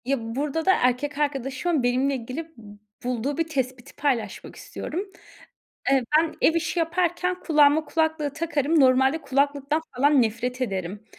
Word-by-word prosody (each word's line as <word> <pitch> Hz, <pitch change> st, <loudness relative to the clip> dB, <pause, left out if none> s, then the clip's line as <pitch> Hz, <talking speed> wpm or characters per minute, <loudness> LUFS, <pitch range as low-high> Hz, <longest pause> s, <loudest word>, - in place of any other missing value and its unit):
Ya, 275 Hz, +2 st, +1 dB, 0.2 s
burada 300 Hz, +3 st, -2 dB
da 380 Hz, -, +6 dB
erkek 255 Hz, +2 st, 0 dB
arkadaşımın 280 Hz, +1 st, -1 dB
benimle 255 Hz, +3 st, +1 dB
ilgili 255 Hz, +6 st, -5 dB
b 205 Hz, -2 st, -13 dB, 0.3 s
bulduğu 250 Hz, +3 st, -2 dB
bir 330 Hz, -1 st, 0 dB
tespiti 255 Hz, -5 st, -4 dB
paylaşmak 265 Hz, -6 st, -2 dB
istiyorum. 350 Hz, +6 st, -5 dB, 0.9 s
Eee, 270 Hz, -1 st, +4 dB, 0.2 s
ben 325 Hz, 0 st, 0 dB
ev 325 Hz, -, +4 dB
işi 335 Hz, +1 st, -1 dB
yaparken 355 Hz, +2 st, 0 dB
kulağıma 300 Hz, -1 st, +4 dB
kulaklığı 315 Hz, -2 st, 0 dB
takarım. 305 Hz, 0 st, +1 dB
Normalde 265 Hz, +3 st, +4 dB
kulaklıktan 285 Hz, +2 st, 0 dB, 0.2 s
falan 280 Hz, +1 st, +4 dB
nefret 240 Hz, +3 st, -2 dB
ederim. 195 Hz, -3 st, -3 dB
280 Hz, 140 wpm, -25 LUFS, 255-320 Hz, 0.9 s, da